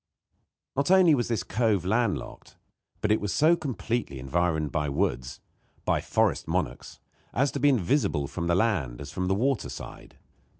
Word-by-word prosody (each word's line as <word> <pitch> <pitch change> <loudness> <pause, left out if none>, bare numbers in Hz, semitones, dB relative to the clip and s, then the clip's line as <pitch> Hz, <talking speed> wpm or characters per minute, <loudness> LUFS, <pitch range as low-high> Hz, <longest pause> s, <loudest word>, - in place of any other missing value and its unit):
Not 140 +3 0
only 185 -4 +6
was 120 -5 +1
this 115 -6 -1
cove 110 -6 0
land 115 +5 +2
locked, - - -11 0.5
but 105 - +1
it 110 - +2
was 100 -1 -2
so 160 +3 +4
completely 120 - -3
environed 80 +3 0
by 75 -1 -1
woods 65 -2 -2 0.5
by - - +1
forest - - 0
monarchs - - -3 0.4
as 140 +2 +2
to 140 - -4
be 145 +2 +4
as 135 - +4
invisible 85 - +1
from 80 +5 -4
the 85 - +2
land 85 - 0
as 70 - -8
from 90 0 -2
the 95 - +2
water 130 +4 0
side. - - -10
105 Hz, 175 wpm, -27 LUFS, 80-130 Hz, 0.5 s, only